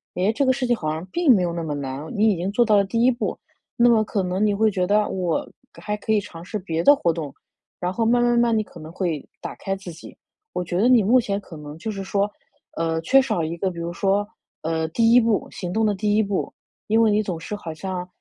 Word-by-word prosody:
“哎， 190 +4 +2
这 275 +5 +1
个 260 - +4
事 255 -1 -2
情 240 - +3
好 155 -8 -3
像 160 +3 -5
并 340 -7 +5
没 185 -5 +2
有 170 - -1
那 170 -1 -3
么 155 -2 -3
难。” 140 +1 -5
你 215 +2 +4
已 205 - +2
经 180 +3 -3
做 240 +4 +3
到 215 -2 +4
了 200 - +5
第 230 +4 -1
1 245 - +5
步， 240 - -3 0.4
那 240 0 +5
么 225 -2 +4
可 210 -1 -1
能 185 +3 0
你 210 - +2
会 220 +2 +3
觉 185 -3 0
得： 210 +2 +2
“我 180 -4 -2 0.3
还 210 - -2
可 210 - -3
以 215 - +4
尝 175 -5 -10
试 210 +3 -4
别 165 -3 -2
的 285 - +8
活 170 -11 +1
动。” 155 -4 -5 0.5
然 180 0 -1
后 225 +4 -1
慢 240 +1 +3
慢 240 0 +3
慢 240 - +3
慢， 235 -1 +3
你 215 - +1
可 175 - -14
能 155 0 -9
会 170 -5 -2 0.2
打 - - -5
开 195 -1 -3
自 190 -2 -9
己。 165 - -12 0.4
我 180 - -2
觉 175 0 -3
得 230 - +4
你 245 -4 +5
目 240 +6 +5
前 200 -4 -2
可 170 -5 -11
能 150 0 -9
就 220 +7 -4
是 195 -2 -5
说， 200 +1 0 0.5
呃， 165 0 0
缺 270 +11 +5
少 215 -11 -1
一 165 +2 -3
个 190 +2 0
比 175 - -9
如 170 0 -3
说， 195 +3 +1 0.4
呃， 160 0 -1
第 225 +7 +3
1 245 - +8
步 225 -3 +1
行 180 -1 -5
动 220 0 +2
的 210 - +2
第 205 +1 0
1 220 - +3
步， 200 -2 -2 0.4
因 220 +2 +3
为 220 -2 +4
你 210 +1 +3
总 185 -5 -4
是 205 +5 -6
好 165 -5 -7
像 180 +2 -5
200 Hz, 285 characters per minute, -23 LUFS, 170-220 Hz, 0.5 s, 的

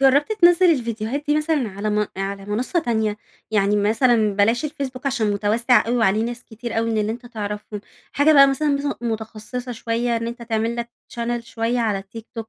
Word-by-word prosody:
جربت 275 +6 +4
تنزل 355 -3 +5
الفيديوهات 235 0 -2
دي 295 - +3
مثلًا 300 -6 0
على 200 +2 -3
م 210 0 +1
على 195 0 -4
منصة 235 - -1
تانية؟ 220 -8 0 0.3
يعني 205 -1 +2
مثلًا 220 0 +3
بلاش 225 +6 +2
الفيسبوك 275 -3 -5
عشان 225 -5 +1
مُتوَسِّع 220 +5 +2
أوي 240 +2 0
وعليه 220 -2 +2
ناس 240 +1 -5
كتير 225 0 -5
أوي 230 0 0
من 220 - 0
اللي 215 +1 0
أنتَ 245 +1 -9
تعرفهم. 210 -2 -5 0.3
حاجة 290 +2 +4
بقى 275 -2 +8
مثلًا 295 +2 0
مث 280 0 0
متخصصة 225 +2 -5
شوية 235 +1 -1
إن 230 0 -3
أنت 235 +1 -6
تعمل 225 0 -1
لَك 235 0 -3 0.3
channel 235 0 -2
شوية 235 +1 -2
على 215 -4 0
التيك 210 +3 -10
توك 225 -1 -6
230 Hz, 190 wpm, -22 LUFS, 215-255 Hz, 0.3 s, بقى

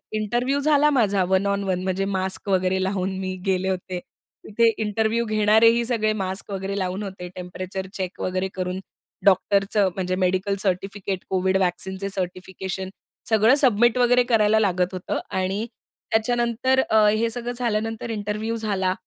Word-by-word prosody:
Interview 240 +6 0
झाला 295 0 +4
माझा 205 -9 +2
one 190 +1 +2
on 200 0 0
one. 185 -2 -1
म्हणजे 190 +1 -1
मास्क 190 0 -2
वगैरे 190 0 +1
लावून 190 0 -2
मी 185 -1 -3
गेले 190 0 +1
होते. 185 -1 -3 0.4
तिथे 230 +2 +3
इंटरव्ह्यू 220 +2 0
घेणारेही 220 +2 +4
सगळे 225 -3 +1
मास्क 190 +2 -4
वगैरे 195 0 -3
लावून 185 +2 -2
होते. 190 -2 -7
टेम्परेचर 185 +1 -6
चेक 185 -3 -5
वगैरे 185 +1 -1
करून 185 0 -3 0.5
डॉक्टरचं 200 +1 +3
म्हणजे 185 -1 -1
मेडिकल 185 +2 +1
सर्टिफिकेट, 195 0 -2
कोविड 190 0 +1
व्हॅक्सीनचे 190 +1 -2
सर्टिफिकेशन 190 0 -5 0.4
सगळं 220 +3 +5
सबमिट 240 +1 +3
वगैरे 245 0 +4
करायला 220 -3 +3
लागत 185 -3 +1
होतं 185 -1 -3 0.2
आणि 190 +4 -1 0.5
त्याच्यानंतर 240 +3 +1
अ, 220 -1 +5
हे 215 +2 +2
सगळं 240 +1 -4
झाल्यानंतर 225 -1 -2
इंटरव्ह्यू 215 +1 -3
झाला 200 -4 0
200 Hz, 145 wpm, -23 LUFS, 185-220 Hz, 0.5 s, सगळं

